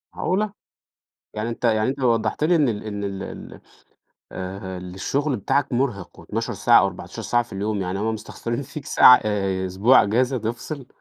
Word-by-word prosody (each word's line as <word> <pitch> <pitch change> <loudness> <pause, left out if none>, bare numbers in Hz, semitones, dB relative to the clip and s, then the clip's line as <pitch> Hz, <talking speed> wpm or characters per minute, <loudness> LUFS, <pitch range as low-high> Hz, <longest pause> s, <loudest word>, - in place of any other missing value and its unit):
معقولة! 200 +2 -1 0.8
يعني 110 +2 -3
أنتَ 120 +1 -6
يعني 110 -1 +2
أنتَ 135 +2 -3
وضحت 120 +3 +1
لي 175 +2 +4
إن 150 -5 +3
ال 110 -3 -3
إن 105 -1 -4
ال 100 -1 -4
ال - - -9 0.7
آآ 95 0 -6
الشغل 95 +11 -2
بتاعك 135 +6 0
مرهق 120 -7 -2
و12 - - -4
ساعة - - +5
أو - - +3
14 - - -8
ساعة 120 0 +1
في 115 - -14
اليوم 100 +1 -2
يعني 95 +1 -3
هم 110 +1 -1
مستخسرين 115 +3 -5
فيك 140 +1 -8
ساعة 125 - +7
آآ 95 -3 -1
أسبوع 100 +8 +4
أجازة 125 +5 +1
تفصل. 120 +4 -5
110 Hz, 175 wpm, -23 LUFS, 100-130 Hz, 0.8 s, ساعة